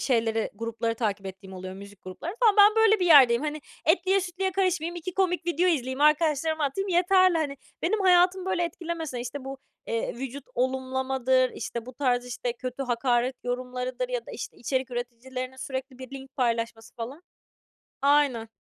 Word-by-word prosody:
şeyleri, 225 -3 +1
grupları 230 0 -2
takip 205 -4 -2
ettiğim 190 0 -9
oluyor, 185 0 -7
müzik 200 0 -12
grupları 185 - -7
falan. 435 -4 +5
Ben 415 +2 +7
böyle 435 -2 +5
bir 360 - +2
yerdeyim, 260 -6 +7
hani. 305 0 -3 0.3
Etliye 370 +5 +3
sütlüye 370 +1 -2
karışmayayım, 360 -3 0
2 345 +1 -6
komik 360 -2 0
video 345 +2 +2
izleyeyim, 260 -4 -1
arkadaşlarıma 305 0 +3
atayım 390 +9 -2
yeterli, 370 0 +4
hani, 285 -3 -2 0.3
benim 410 +5 +1
hayatımı 365 0 +4
böyle 350 -2 +1
etkilemese, 330 -6 -4
işte, 255 +3 -6
bu, 270 0 -6 0.3
eee, 230 0 -2
vücut 265 +2 -6
olumlamadır, 260 0 +1
işte, 235 -1 -6
bu 255 - -8
tarz, 250 -2 0
işte, 245 0 -3
kötü 255 +2 -5
hakaret 245 0 +1
yorumlarıdır 250 - -3
ya - - -1
da - - -8
işte - - -7
içerik 260 +1 -2
üreticilerinin 255 +2 -5
sürekli 260 -1 -6
bir 260 -1 -9
link 265 +1 -14
paylaşması 230 -3 -1
falan 250 +8 -7 0.8
Aynen. 280 -5 +3
265 Hz, 165 wpm, -27 LUFS, 245-340 Hz, 0.8 s, Ben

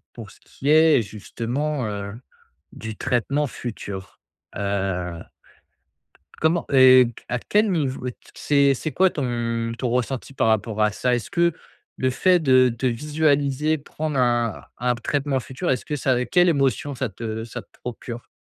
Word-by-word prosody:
pour 115 -4 -9
ce - - -19
qui 140 - -5
est 155 -3 +6
justement, 120 +6 -3
heu, 100 -1 -5 0.6
du 110 -1 -7
traitement 135 +4 0
futur, 100 -7 -7 0.4
heu, 95 -4 -2 1.2
comment 165 +2 +2
et 130 -1 +8 0.2
à 125 - -1
quel 210 - +1
niveau 135 -7 -1
t - - -15 0.2
c'est 140 -1 +3
c'est 155 +4 -4
quoi 190 +1 +4
ton 115 -4 -2
ton 125 - -1
ressenti 125 +2 -2
par 115 - +2
rapport 110 0 0
à 105 0 +3
ça? 125 +3 +1
Est-ce 120 -4 -4
que 170 0 +2 0.4
le 130 - +1
fait 180 +8 +3
de 130 -4 +5
de 130 - +1
visualiser 150 +2 +1
prendre 150 0 -4
un 120 -3 +1 0.2
un 125 +1 +1
traitement 140 +3 -1
futur, 130 - -4
est-ce 125 - 0
que 150 - -2
ça 125 -2 +1
quelle 180 0 +4
émotion 140 -1 0
ça 130 0 -2
te 110 +2 -5
ça 115 - -7
te - - -31
procure? 120 0 -7
130 Hz, 155 wpm, -23 LUFS, 115-145 Hz, 1.2 s, et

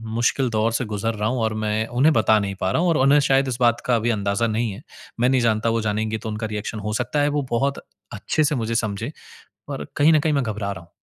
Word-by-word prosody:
मुश्किल 120 +2 +1
दौर 110 +1 +1
से 125 +1 -1
गुज़र 105 +2 -2
रहा 105 +1 -1
हूँ 125 -1 -1
और 110 -1 0
मैं 110 +1 0
उन्हें 135 +6 +3
बता 110 -1 +4
नहीं 100 -1 -3
पा 95 - +1
रहा 165 - +1
हूँ 180 - +2
और 165 - +2
उन्हें 140 +3 +5
शायद 135 -1 +2
इस 125 -2 -2
बात 120 -1 +3
का 125 - +2
अभी 115 +1 0
अंदाज़ा 100 +1 0
नहीं 115 0 -1
है। 100 +6 -9 0.4
मैं 125 +2 +3
नहीं 130 -1 +2
जानता 110 -1 +1
वो 115 0 0
जानेंगी 110 +1 -1
तो 110 - -6
उनका 105 +1 -3
रिएक्शन 105 +1 -5
हो 105 +1 -4
सकता 130 +5 -1
है 145 - +2
वो - - +1
बहुत 140 +4 0 0.3
अच्छे 130 +9 0
से 150 +1 +1
मुझे 115 -2 -2
समझे, 110 +2 -2 0.6
और 140 -2 -5
कहीं 150 +3 +5
न 155 - +4
कहीं 155 0 0
मैं 140 -2 +1
घबरा 105 -3 -3
रहा 95 - -8
हूँ। 85 - -26
115 Hz, 265 wpm, -22 LUFS, 110-130 Hz, 0.6 s, उन्हें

